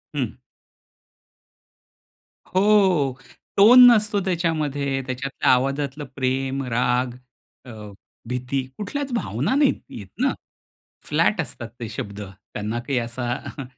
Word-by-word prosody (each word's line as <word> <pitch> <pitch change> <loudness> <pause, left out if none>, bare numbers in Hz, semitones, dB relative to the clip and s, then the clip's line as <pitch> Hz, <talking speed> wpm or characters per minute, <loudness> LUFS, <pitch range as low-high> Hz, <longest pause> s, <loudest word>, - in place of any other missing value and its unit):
हं. 130 -4 -2 2.1
हो. 185 -7 +3 0.4
टोन 245 +5 +9
नसतो 210 -2 +2
त्याच्यामध्ये. 150 -6 -1
त्याच्यातल्या 130 +2 -1
आवाजातलं 140 +3 0
प्रेम, 135 +1 -1
राग 125 +1 +1 0.5
अ, 125 - -10 0.6
भीती 125 +2 -2 0.2
कुठल्याच 275 +6 -4
भावना 240 +2 -1
नाही 285 -1 +4
आहेत 100 - -10 0.2
ना, - - +2 0.7
फ्लॅट - - +2
असतात 120 - -7
ते 115 - -4
शब्द, 105 -1 -6
त्यांना 105 +3 -6
काही 130 +2 -2
असा 120 +1 -4
अ, 140 - -5
135 Hz, 105 wpm, -23 LUFS, 125-180 Hz, 2.1 s, टोन